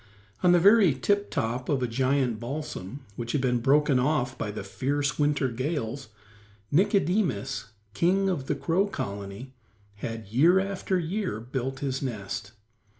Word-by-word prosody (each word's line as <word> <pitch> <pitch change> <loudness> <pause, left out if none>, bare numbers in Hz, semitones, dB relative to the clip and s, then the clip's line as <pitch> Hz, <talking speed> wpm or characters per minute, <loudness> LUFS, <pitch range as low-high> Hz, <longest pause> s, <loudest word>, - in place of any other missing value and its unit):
On 180 - +5
the 175 - +6
very 200 -4 +6
tip 205 +10 +1
top 120 +3 -2
of 135 -3 +1
a - - +1
giant 130 -1 +1
balsam, 135 -1 -6
which 115 -1 -4
had 145 - +1
been 125 -2 +1
broken 140 +2 +3
off 130 -2 +1
by 105 - -3
the 105 -1 -5
fierce 140 +9 -1
winter 145 -2 +2
gales, 130 0 -3 0.6
Nicodemus, 185 - +1 0.3
king 190 - +2
of 145 -8 -1
the 150 - 0
Crow 175 +7 +1
Colony, 100 - -6 0.4
had, 115 +1 -5
year 165 - +5
after 195 -1 -1
year, 180 - -2
built 130 +2 -4
his 135 -2 -2
nest. 110 -4 -5
135 Hz, 150 wpm, -27 LUFS, 120-170 Hz, 0.6 s, the